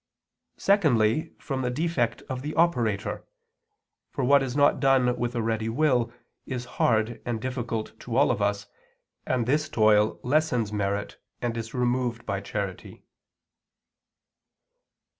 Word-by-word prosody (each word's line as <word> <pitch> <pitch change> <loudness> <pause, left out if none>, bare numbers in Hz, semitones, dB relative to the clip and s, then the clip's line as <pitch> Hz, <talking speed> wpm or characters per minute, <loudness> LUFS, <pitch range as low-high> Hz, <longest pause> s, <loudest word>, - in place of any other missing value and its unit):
Secondly, 155 - +2
from 135 -3 -4
the 125 - 0
defect 135 -3 -1
of 130 -1 -5
the 150 +3 -5
operator; 120 - +1 0.9
for 135 - -3
what 140 +2 +5
is 130 -1 -3
not 145 0 +4
done 130 -3 +3
with 120 0 -3
a 115 - 0
ready 110 0 -1
will 125 -2 +2 0.4
is 125 -2 -4 0.2
hard 110 0 +2
and 120 -2 -2
difficult 120 -3 -4
to 120 - -5
all 135 0 +4
of 115 -4 -2
us, 100 0 0 0.6
and 125 -3 +1
this 150 +5 +1
toil 110 -4 +3
lessens 125 -6 +1
merit 100 0 -2 0.2
and 120 -1 -2
is 115 +1 -5
removed 125 -1 0
by 100 -1 -2
charity. 100 -2 -5
120 Hz, 135 wpm, -26 LUFS, 110-135 Hz, 0.9 s, what